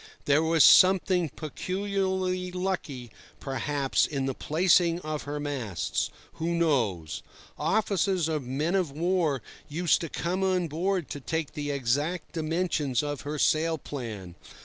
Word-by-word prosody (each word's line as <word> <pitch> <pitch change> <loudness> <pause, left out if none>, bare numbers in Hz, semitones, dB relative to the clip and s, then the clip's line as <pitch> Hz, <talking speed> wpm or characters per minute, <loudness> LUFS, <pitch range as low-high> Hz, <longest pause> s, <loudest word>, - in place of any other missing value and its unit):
There 145 +2 +4
was 160 -2 +4
something 185 -1 +6
peculiarly 185 +3 -2
lucky, 180 - -3 0.3
perhaps, 135 +1 0
in 140 -3 -2
the 135 - -1
placing 170 +3 +3
of 155 -2 -4
her 145 +1 -4
masts—who 145 - -3
knows? 110 - 0 0.3
Officers 190 0 +1
of 155 -2 -1
men 135 +7 -2
of 185 -5 +1
war 160 - 0 0.3
used 170 +3 +2
to 165 - -4
come 180 +5 -2
on 185 -2 +1
board 175 +1 -1
to 145 - -4
take 160 +2 -3
the 145 -2 -4
exact 145 +6 -1
dimensions 160 -5 0
of 145 -2 -3
her 150 +1 -4
sail 160 +2 +2
plan. 110 - -7
155 Hz, 130 wpm, -28 LUFS, 140-180 Hz, 0.3 s, something